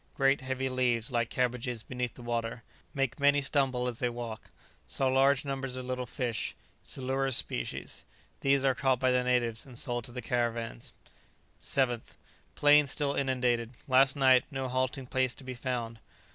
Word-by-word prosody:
Great 135 Hz, 0 st, +3 dB
heavy 130 Hz, 0 st, -2 dB
leaves, 125 Hz, -1 st, +1 dB
like 120 Hz, -1 st, 0 dB
cabbages, 125 Hz, -2 st, -1 dB
beneath 125 Hz, -2 st, -4 dB
the 125 Hz, -, -11 dB
water, 115 Hz, -1 st, -3 dB, 0.3 s
make 135 Hz, 0 st, -1 dB
many 145 Hz, 0 st, +5 dB
stumble 135 Hz, -3 st, +1 dB
as 120 Hz, -2 st, -4 dB
they 125 Hz, -, +1 dB
walk. 120 Hz, -2 st, -7 dB, 0.4 s
Saw 135 Hz, -, 0 dB
large 135 Hz, +1 st, +3 dB
numbers 135 Hz, -2 st, -3 dB
of 130 Hz, -, -5 dB
little 125 Hz, -1 st, -3 dB
fish, 120 Hz, -3 st, -3 dB, 0.3 s
silurus 135 Hz, 0 st, 0 dB
species; -, -, -3 dB, 0.4 s
these 135 Hz, 0 st, +2 dB
are 135 Hz, -, +4 dB
caught 130 Hz, -1 st, +1 dB
by 130 Hz, 0 st, +3 dB
the 125 Hz, 0 st, +2 dB
natives, 120 Hz, -3 st, +1 dB
and 125 Hz, -3 st, -11 dB
sold 120 Hz, -2 st, -1 dB
to -, -, -8 dB
the 125 Hz, -, -6 dB
caravans. 115 Hz, -, -2 dB, 0.7 s
7th. 120 Hz, -4 st, -1 dB, 0.4 s
Plain 145 Hz, 0 st, +6 dB
still 140 Hz, +1 st, 0 dB
inundated. 125 Hz, -3 st, 0 dB
Last 130 Hz, +1 st, +5 dB
night, 130 Hz, -2 st, +5 dB
no 135 Hz, -3 st, -3 dB
halting 130 Hz, +1 st, -1 dB
place 130 Hz, -1 st, 0 dB
to -, -, -10 dB
be 130 Hz, 0 st, -5 dB
found. 120 Hz, -2 st, -4 dB
130 Hz, 165 wpm, -30 LUFS, 120-135 Hz, 0.7 s, Plain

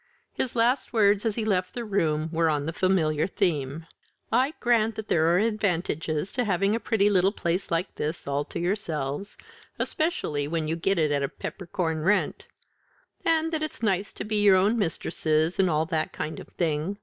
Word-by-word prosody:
His 250 Hz, -, -2 dB
last 245 Hz, +4 st, +1 dB
words 205 Hz, -1 st, +3 dB
as 215 Hz, -, -1 dB
he 225 Hz, -, -2 dB
left 185 Hz, -1 st, 0 dB
the 240 Hz, -1 st, -3 dB
room 160 Hz, -6 st, 0 dB
were 165 Hz, 0 st, +2 dB
on 145 Hz, -2 st, 0 dB
the 165 Hz, -, -3 dB
familiar 160 Hz, -5 st, +1 dB
theme. 160 Hz, -5 st, -1 dB, 0.5 s
"I 260 Hz, +6 st, +2 dB
grant 230 Hz, -2 st, +2 dB
that 220 Hz, 0 st, -7 dB
there 160 Hz, 0 st, +3 dB
are 170 Hz, +1 st, +4 dB
advantages 180 Hz, -6 st, -1 dB
in -, -, +4 dB
having 195 Hz, +1 st, +1 dB
a 230 Hz, -, 0 dB
pretty 210 Hz, -3 st, +2 dB
little 195 Hz, -1 st, +3 dB
place 180 Hz, -1 st, -2 dB
like 170 Hz, +3 st, -1 dB
this 155 Hz, +3 st, -3 dB
all 140 Hz, +1 st, -1 dB
to -, -, -6 dB
yourselves, 170 Hz, -2 st, -3 dB, 0.4 s
especially 155 Hz, -, -1 dB
when 160 Hz, 0 st, -2 dB
you 160 Hz, -, 0 dB
get 195 Hz, +3 st, 0 dB
it 155 Hz, -3 st, +2 dB
at 145 Hz, -1 st, +1 dB
a 140 Hz, -, -1 dB
peppercorn 170 Hz, -4 st, -4 dB
rent; 200 Hz, +6 st, +1 dB, 0.8 s
and 325 Hz, -1 st, +2 dB
that 315 Hz, -, 0 dB
it's 310 Hz, -6 st, -5 dB
nice 200 Hz, -1 st, +1 dB
to -, -, -5 dB
be 210 Hz, 0 st, 0 dB
your 200 Hz, -2 st, +6 dB
own 200 Hz, +5 st, +3 dB
mistresses, 160 Hz, -4 st, 0 dB
and 190 Hz, -2 st, +4 dB
all 155 Hz, 0 st, +1 dB
that 160 Hz, -1 st, -2 dB
kind 155 Hz, -, -4 dB
of -, -, -10 dB
thing. 165 Hz, +3 st, -2 dB
185 Hz, 190 wpm, -26 LUFS, 160-210 Hz, 0.8 s, your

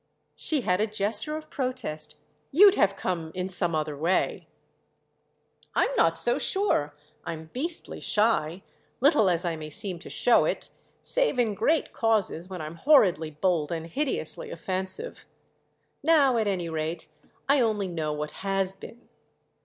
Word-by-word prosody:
She 305 Hz, -4 st, +1 dB
had 180 Hz, -3 st, +1 dB
a 215 Hz, -, +2 dB
gesture 215 Hz, +8 st, 0 dB
of 310 Hz, 0 st, -11 dB
protest 255 Hz, -, -3 dB, 0.4 s
"You'd 390 Hz, +6 st, +7 dB
have 200 Hz, -, +2 dB
come 170 Hz, -4 st, -3 dB
in 180 Hz, 0 st, -2 dB
some 175 Hz, -3 st, 0 dB
other 155 Hz, -1 st, -2 dB
way." 165 Hz, +6 st, 0 dB, 1.3 s
"I'm -, -, +2 dB
not -, -, +3 dB
so -, -, +1 dB
sure! 380 Hz, -, 0 dB, 0.3 s
I'm 160 Hz, -1 st, -7 dB
beastly 325 Hz, +6 st, -3 dB
shy—little 210 Hz, -, +1 dB
as 175 Hz, 0 st, 0 dB
I 170 Hz, -1 st, -1 dB
may 155 Hz, -1 st, -7 dB
seem 195 Hz, 0 st, -2 dB
to 190 Hz, -, -10 dB
show 245 Hz, -, +4 dB
it: -, -, -3 dB, 0.3 s
save -, -, +1 dB
in 230 Hz, -4 st, +2 dB
great 305 Hz, +10 st, +1 dB
causes, 210 Hz, -6 st, 0 dB
when 185 Hz, -3 st, -6 dB
I'm 155 Hz, +2 st, -7 dB
horridly 185 Hz, -, +4 dB
bold 155 Hz, 0 st, 0 dB
and 165 Hz, -1 st, -3 dB
hideously 295 Hz, -, -3 dB
offensive. 190 Hz, -, -3 dB, 0.7 s
Now 285 Hz, -5 st, +4 dB
at 220 Hz, -2 st, +1 dB
any 185 Hz, -4 st, -1 dB
rate 160 Hz, +1 st, -4 dB, 0.4 s
I 280 Hz, -1 st, +4 dB
only 215 Hz, -4 st, 0 dB
know 160 Hz, -4 st, -3 dB
what 150 Hz, 0 st, -4 dB
has 195 Hz, -1 st, 0 dB
been." 230 Hz, +4 st, -13 dB
195 Hz, 145 wpm, -27 LUFS, 165-255 Hz, 1.3 s, You'd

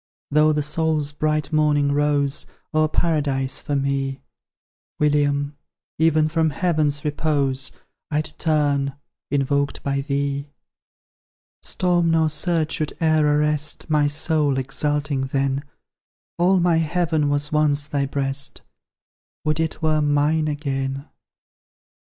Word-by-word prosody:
Though 150 Hz, +1 st, +4 dB
the 150 Hz, -1 st, 0 dB
soul's 150 Hz, -1 st, 0 dB
bright 155 Hz, +1 st, -1 dB
morning 150 Hz, -2 st, +3 dB
rose 145 Hz, -1 st, 0 dB, 0.3 s
O'er 155 Hz, 0 st, +3 dB
Paradise 145 Hz, -5 st, 0 dB
for 145 Hz, -, -2 dB
me, 135 Hz, -1 st, -1 dB, 0.8 s
William! 145 Hz, -1 st, +1 dB, 0.4 s
even 155 Hz, -1 st, +3 dB
from 160 Hz, 0 st, +1 dB
Heaven's 150 Hz, -2 st, 0 dB
repose 140 Hz, -3 st, 0 dB, 0.4 s
I'd 155 Hz, 0 st, 0 dB
turn, 145 Hz, -3 st, +1 dB, 0.3 s
invoked 140 Hz, 0 st, 0 dB
by 140 Hz, 0 st, 0 dB
thee! 140 Hz, 0 st, -2 dB, 1.1 s
Storm 175 Hz, -3 st, +1 dB
nor 160 Hz, -1 st, +3 dB
surge 155 Hz, 0 st, 0 dB
should 155 Hz, -3 st, -2 dB
e'er 155 Hz, -2 st, +3 dB
arrest 150 Hz, +1 st, +1 dB
My 150 Hz, -1 st, +3 dB
soul, 145 Hz, -1 st, +1 dB
exalting 140 Hz, +1 st, -1 dB
then: 135 Hz, +1 st, -1 dB, 0.8 s
All 185 Hz, +2 st, +4 dB
my 175 Hz, -1 st, +3 dB
heaven 160 Hz, -2 st, +1 dB
was 145 Hz, +1 st, -1 dB
once 150 Hz, -2 st, +2 dB
thy 140 Hz, -2 st, -1 dB
breast, 135 Hz, 0 st, -1 dB, 0.8 s
Would 155 Hz, 0 st, +1 dB
it 160 Hz, 0 st, -2 dB
were 155 Hz, -1 st, +2 dB
mine 150 Hz, +2 st, +2 dB
again! 140 Hz, -2 st, -3 dB
150 Hz, 115 wpm, -22 LUFS, 140-155 Hz, 1.1 s, Though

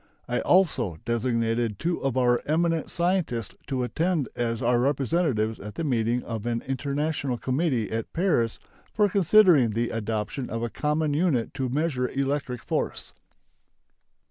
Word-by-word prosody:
I 125 Hz, -, 0 dB
also 135 Hz, -, +2 dB
designated 115 Hz, -2 st, 0 dB
two 170 Hz, -, -2 dB
of 135 Hz, -2 st, 0 dB
our 120 Hz, -1 st, +3 dB
eminent 165 Hz, +1 st, +1 dB
scientists 170 Hz, -, -1 dB
to 130 Hz, -3 st, -1 dB
attend 160 Hz, +3 st, 0 dB
as 115 Hz, -1 st, -1 dB
our 120 Hz, -1 st, +2 dB
representatives 135 Hz, -4 st, 0 dB
at 105 Hz, +1 st, -8 dB
the 165 Hz, -, -3 dB
meeting 120 Hz, -3 st, 0 dB
of 115 Hz, -1 st, -5 dB
an 115 Hz, -1 st, -1 dB
international 140 Hz, 0 st, -2 dB
committee 130 Hz, -3 st, 0 dB
at 115 Hz, 0 st, -3 dB
Paris 165 Hz, -, +1 dB, 0.4 s
for 210 Hz, -1 st, +4 dB
considering 180 Hz, -, +5 dB
the 115 Hz, +2 st, -1 dB
adoption 115 Hz, +3 st, -3 dB
of 115 Hz, +1 st, -3 dB
a 120 Hz, -, -3 dB
common 150 Hz, 0 st, 0 dB
unit 145 Hz, -7 st, +1 dB
to 130 Hz, -3 st, -2 dB
measure 135 Hz, -2 st, 0 dB
electric 135 Hz, -2 st, -2 dB
force. -, -, -3 dB
130 Hz, 145 wpm, -26 LUFS, 115-155 Hz, 0.4 s, considering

